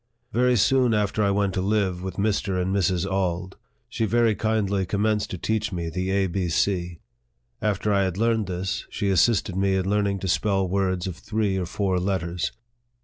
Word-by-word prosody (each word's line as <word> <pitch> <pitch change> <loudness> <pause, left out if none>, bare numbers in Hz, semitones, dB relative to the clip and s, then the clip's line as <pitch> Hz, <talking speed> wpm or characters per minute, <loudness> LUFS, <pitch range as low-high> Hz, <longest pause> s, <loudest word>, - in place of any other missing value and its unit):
Very 125 +1 +3
soon 125 +2 +3
after 105 0 0
I 100 - +3
went 100 -1 +1
to 95 - -1
live 95 -3 0
with 95 -1 -5
Mr. 100 -2 0
and 95 +2 0
Mrs. 90 -1 +1
Auld, 95 -1 -2 0.3
she 115 - -1
very 115 +1 +3
kindly 100 -2 0
commenced 105 +2 0
to 90 - -4
teach 110 +3 -1
me 85 -3 -3
the 90 +3 -2
A, 95 0 +2
B, 90 0 -2
C. 90 0 0 0.6
After 105 0 0
I 100 - +3
had 95 -1 -3
learned 115 -2 +1
this, 90 0 -3
she 100 - -2
assisted 95 0 +2
me 95 0 +2
in 95 0 0
learning 100 -1 +1
to 95 - -3
spell 95 +1 +1
words 95 -1 0
of 90 -3 -5
three 105 0 -1
or 90 -2 -2
four 95 0 0
letters. 90 -2 -1
95 Hz, 190 wpm, -24 LUFS, 90-105 Hz, 0.6 s, Very